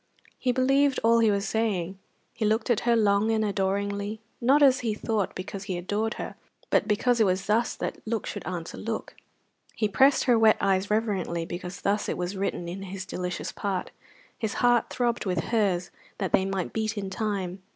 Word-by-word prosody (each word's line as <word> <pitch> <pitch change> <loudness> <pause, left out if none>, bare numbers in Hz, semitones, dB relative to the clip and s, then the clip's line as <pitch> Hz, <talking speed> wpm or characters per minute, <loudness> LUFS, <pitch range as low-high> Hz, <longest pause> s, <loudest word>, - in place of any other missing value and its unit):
He 255 - +1
believed 270 +2 +3
all 230 +1 +5
he 225 -1 +4
was 200 0 0
saying. 195 -4 -1 0.3
He 230 - -4
looked 220 +4 +1
at 230 - +3
her 235 - +5
long 210 -1 +3
and 220 -1 +2
adoringly, 200 +1 -1 0.2
not, 275 +5 +5
as 265 -1 +6
he 225 -3 -1
thought, 215 -2 -1
because 195 +1 -6
he 185 -3 -3
adored 210 +5 -1
her, - - -5 0.4
but - - +3
because 235 +3 +2
it 220 - +5
was 185 0 0
thus 225 +4 +1
that - - -4
look 225 -2 -1
should - - -5
answer 175 -2 -5
look; 225 0 -4 0.6
he 215 - +1
pressed 270 +7 +4
her 240 -3 +4
wet 220 -1 +6
eyes 195 0 +1
reverently 200 -6 0
because 180 +2 -6
thus 205 +1 0
it - - -2
was 180 +2 -3
written 190 -3 -2
in 180 +3 -5
his 190 0 -6
delicious 180 -2 -4
part; 195 -3 -3 0.5
his 220 -2 -2
heart 245 -1 +3
throbbed 240 -4 -1
with 180 -2 0
hers 195 -6 +1 0.3
that 190 -5 -2
they 190 - +4
might 190 -2 -2
beat 220 -1 -1
in 195 -2 -4
time. 195 -3 -3
205 Hz, 195 wpm, -27 LUFS, 190-225 Hz, 0.6 s, as